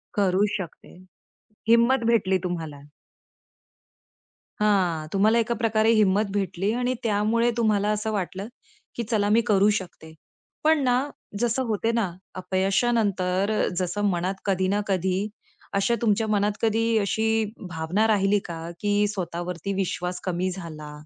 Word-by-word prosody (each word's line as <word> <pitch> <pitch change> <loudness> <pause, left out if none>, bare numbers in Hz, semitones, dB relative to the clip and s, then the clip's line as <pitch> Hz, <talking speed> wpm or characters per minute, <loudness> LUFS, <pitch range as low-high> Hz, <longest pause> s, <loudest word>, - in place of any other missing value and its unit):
करू 195 0 +3
शकते. 180 -5 -9 0.7
हिंमत 235 +2 +4
भेटली 190 -5 +2
तुम्हाला. 160 -5 -5 1.8
हां. 180 -7 +2
तुम्हाला 215 +4 +3
एका 230 +1 0
प्रकारे 220 0 +2
हिंम्मत 210 -1 +3
भेटली 195 0 -1
आणि 250 +1 0
त्यामुळे 225 +2 +2
तुम्हाला 210 -3 +2
असं 215 +1 -1
वाटलं, 195 0 -3 0.5
की 235 - -2
चला 205 -2 0
मी 225 +2 +4
करू 205 -1 +3
शकते. 170 -3 -9 0.5
पण 310 -2 +3
ना, 255 +2 +1 0.3
जसं 240 +2 +1
होते 225 +1 0
ना 225 -6 0 0.2
अपयशानंतर, 195 0 +1 0.3
जसं 185 +3 -2
मनात 180 +1 -1
कधी 190 -2 +1
ना 205 - +1
कधी, 190 -1 0 0.6
असा 200 +4 +2
तुमच्या 220 -1 +2
मनात 210 0 +2
कधी 225 0 +2
अशी 220 +2 +1 0.2
भावना 175 +6 0
राहिली 205 -1 +3
का 165 -1 -6
की 205 0 +2
स्वतःवरती 180 -1 -4
विश्वास 180 -2 -2
कमी 185 0 -1
झाला 155 -5 -8
205 Hz, 130 wpm, -25 LUFS, 185-220 Hz, 1.8 s, हिंमत